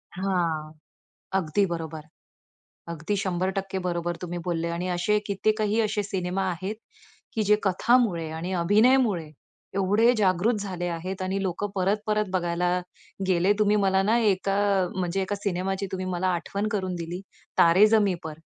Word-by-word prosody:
हां. 170 -5 -1 0.7
अगदी 185 +3 +1
बरोबर. 160 -2 -5 0.9
अगदी 170 +5 -2
100% 190 +1 -2
बरोबर 175 -1 -2
तुम्ही 175 -1 -4
बोलले 170 -1 -1
आणि 175 +2 -3
असे 180 +4 +1
कित्येकही 215 +2 +1
असे 215 -1 0
सिनेमा 190 -1 -2
आहेत, 185 +5 -4 0.6
की 220 - +1
जे 210 +1 +4
कथामुळे 190 -3 +2
आणि 170 +4 -4
अभिनयामुळे 210 -3 +3 0.5
एवढे 205 +5 +4
जागृत 205 +3 +2
झाले 185 -3 -4
आहेत 185 +3 -4
आणि 190 +1 -1
लोकं 195 +2 -2
परत-परत 210 +2 0
बघायला 175 0 0 0.5
गेले. 185 +2 +3
तुम्ही 210 0 +3
मला 195 -1 +3
ना 220 +4 +3
एका 195 -3 +1 0.4
म्हणजे 185 +1 -1
एका 195 +2 -2
सिनेमाची 195 0 -2
तुम्ही 185 0 -3
मला 180 +1 0
आठवण 200 +5 -2
करून 185 -3 -1
दिली, 170 +1 -5 0.4
तारे 180 +5 +7
जमी 210 -4 +3
पर. 160 -1 -6
190 Hz, 140 wpm, -26 LUFS, 175-205 Hz, 0.9 s, तारे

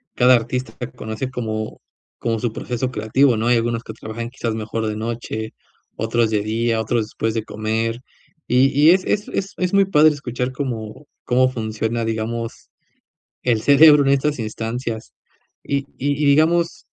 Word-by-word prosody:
cada 125 +1 +6
artista 125 +2 -2
puede 125 0 -6
conocer 110 +2 -5
como 110 -3 -4 0.4
como 115 -1 -1
su 115 -1 -2
proceso 125 +2 -3
creativo, 125 +3 +2
¿no?, 115 - -1
hay 120 0 +4
algunos 115 0 -1
que - - -8
trabajan 115 +1 -6
quizás 115 -4 -3
mejor 110 0 -3
de 105 - -2
noche, 110 0 -4 0.4
otros 115 0 +1
de 105 - +2
día, 115 +2 0
otros 115 +2 0
después 110 +1 -3
de 110 - -1
comer, 110 +2 -2 0.5
y 130 +2 +4
y 145 +3 +5
es 185 +1 +3
es 205 0 0
es 195 0 -3
es 180 +1 -1
muy 200 0 +5
padre 155 -5 +5
escuchar 125 -3 -4
cómo 125 -1 -5 0.2
cómo 130 +1 +3
funciona, 110 0 -2
digamos, 115 +1 -4 0.7
el 115 -3 +1
cerebro 145 +1 +7
en 135 - +1
estas 140 +1 +1
instancias 115 +1 -4 0.5
y 140 0 0 0.2
y 145 +1 0
y - - +3
digamos 160 +4 +3
120 Hz, 165 wpm, -21 LUFS, 110-135 Hz, 0.7 s, cerebro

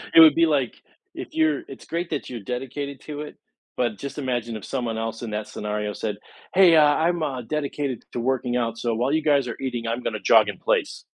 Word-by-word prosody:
it - - +10
would 160 -3 +9
be 165 0 +5
like, 140 -7 +1 0.4
if - - -7
you're 155 -2 +2
it's 135 - -11
great 170 +1 -3
that - - -3
you're 120 -2 -5
dedicated 135 +5 -5
to 150 -1 -6
it, 150 - -8 0.4
but 120 -4 0
just 140 +5 -7
imagine 120 -4 -2
if 110 - -7
someone 120 -4 -2
else 115 +1 -3
in 115 -3 -5
that 105 0 -3
scenario 105 0 -3
said, 105 -2 -3 0.4
"Hey, 185 -3 +7
uh, 155 - +7
I'm, 160 +3 +2
uh, 135 -5 -2
dedicated 140 0 -3
to - - -2
working 125 0 0
out, 115 -2 -1
so 115 -1 -1
while 125 +4 0
you 155 +1 +2
guys 140 -4 +3
are 115 - -5
eating, 120 -3 -3
I'm 120 +2 -1
gonna 110 -2 -3
jog 95 - +5
in - - -5
place." - - 0
130 Hz, 225 wpm, -24 LUFS, 115-150 Hz, 0.4 s, it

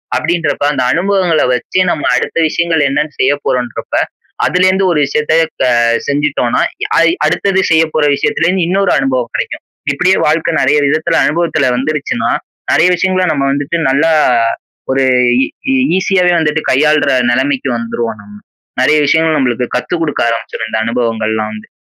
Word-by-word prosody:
அப்பிடின்றப்ப 165 -3 -1
அந்த 130 -3 -1
அனுபவங்கள்ல 180 -1 +1
வச்சு 125 +8 -2
நம்ம 150 - -2
அடுத்த - - -2
விஷயங்கள் 165 0 0
என்னன்னு 150 +2 -2
செய்ய 135 +2 +3
போறோம்ன்றப்ப 125 -2 -3 0.5
அதுலேருந்து 185 +1 +2
ஒரு 160 - +1
விஷயத்த 150 +2 -1 0.3
த - - +3 0.4
செஞ்சுட்டோன்னா 140 -4 0 0.4
ஐ - - +4 0.2
அடுத்தது 195 -1 +1
செய்யப்போற 160 -1 +2
விஷயத்துல 195 +1 -1
இருந்து 180 -1 +1
இன்னொரு 195 +1 +1
அனுபவம் 130 -3 -1
கிடைக்கும். - - -4 0.3
இப்பிடியே 180 +7 +2
வாழ்க்க 160 +2 0
நெறைய 140 +3 +2
விதத்துல 160 +3 0
அனுபவத்துல 160 -2 0
வந்துருச்சுனா, 130 -3 -2 0.4
நிறைய 165 - +4
விஷயங்கள 185 +1 0
நம்ம 140 -3 -1
வந்துட்டு 145 +4 -2
நல்லா 145 +5 +2 0.8
ஒரு 135 0 +1 0.4
ஈ 270 - -2 0.2
ஈசியாவே 185 -1 +2
வந்துட்டு 155 -1 0
கையாளுற 150 +1 +2 0.2
நிலைமைக்கு 135 +2 0
வந்துருவோம் 115 -1 -4
நம்ம. 105 0 -15 0.5
நிறைய 155 - +3
விஷயங்கள் 160 +1 +2
நம்மளுக்கு 125 -3 0
கத்து 125 +7 -2
குடுக்க 155 -3 -2
ஆரம்பிச்சுரும், 115 -1 -4
இந்த 110 - -2
அனுபவங்கள்லாம் 110 -2 -2
வந்து. 110 - -10
150 Hz, 140 wpm, -13 LUFS, 130-170 Hz, 0.8 s, ஐ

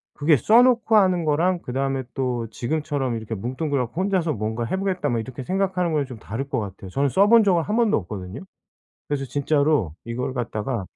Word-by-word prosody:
그게 150 0 +3
써 220 - +5
놓고 235 -3 +3
하는 185 -4 +3
거랑 170 +4 +2
그다음에 135 +1 -2
또 125 -3 -2
지금처럼 145 -1 -2
이렇게 110 0 -5
뭉뚱그려 130 +5 -2
갖고 160 +10 -4
혼자서 185 -5 +1
'뭔가 110 +1 -3
해 150 - -2
보겠다.' 190 -6 -1
뭐 120 -2 0
이렇게 130 +3 -6
생각하는 185 0 0
거랑 150 -2 +1
좀 130 -3 -9
다를 115 +6 -5
것 135 -4 -1
같아요. 100 -2 -7
저는 140 +9 0
써 195 +9 +4
본 230 -1 +7
적은 185 -4 +3
1 210 - -2
번도 230 -3 +3
없거든요. 95 -1 -6 0.7
그래서 140 -2 -2
진짜로 140 - +1
이걸 120 +2 -3
갖다가 115 -3 -3
140 Hz, 415 characters per minute, -23 LUFS, 120-180 Hz, 0.7 s, 본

